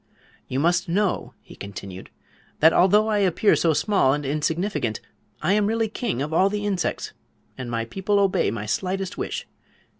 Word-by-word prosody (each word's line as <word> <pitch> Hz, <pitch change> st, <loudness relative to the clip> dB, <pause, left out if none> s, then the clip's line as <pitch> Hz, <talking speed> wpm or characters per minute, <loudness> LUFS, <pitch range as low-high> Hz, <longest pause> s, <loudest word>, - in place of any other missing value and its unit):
"You 130 Hz, -, -2 dB
must 175 Hz, +3 st, +1 dB
know," 195 Hz, +2 st, -1 dB
he -, -, -14 dB
continued, 100 Hz, -2 st, -9 dB, 0.5 s
"that 160 Hz, +2 st, +6 dB
although 205 Hz, +4 st, +4 dB
I 215 Hz, -1 st, +1 dB
appear 195 Hz, +2 st, +3 dB
so 165 Hz, -, +2 dB
small 170 Hz, -6 st, +2 dB
and 145 Hz, -1 st, -5 dB
insignificant, 155 Hz, -, -1 dB, 0.4 s
I 180 Hz, +5 st, +3 dB
am 205 Hz, 0 st, +2 dB
really 225 Hz, 0 st, 0 dB
king 210 Hz, -, -2 dB
of 150 Hz, +2 st, -5 dB
all 190 Hz, +4 st, +4 dB
the 205 Hz, 0 st, -3 dB
insects, 195 Hz, -4 st, -2 dB, 0.4 s
and 130 Hz, -2 st, -6 dB
my 115 Hz, -1 st, -2 dB
people 195 Hz, -, -1 dB
obey 195 Hz, -, +2 dB
my 105 Hz, 0 st, -4 dB
slightest 185 Hz, -, -2 dB
wish. -, -, -4 dB
180 Hz, 170 wpm, -24 LUFS, 135-205 Hz, 0.5 s, that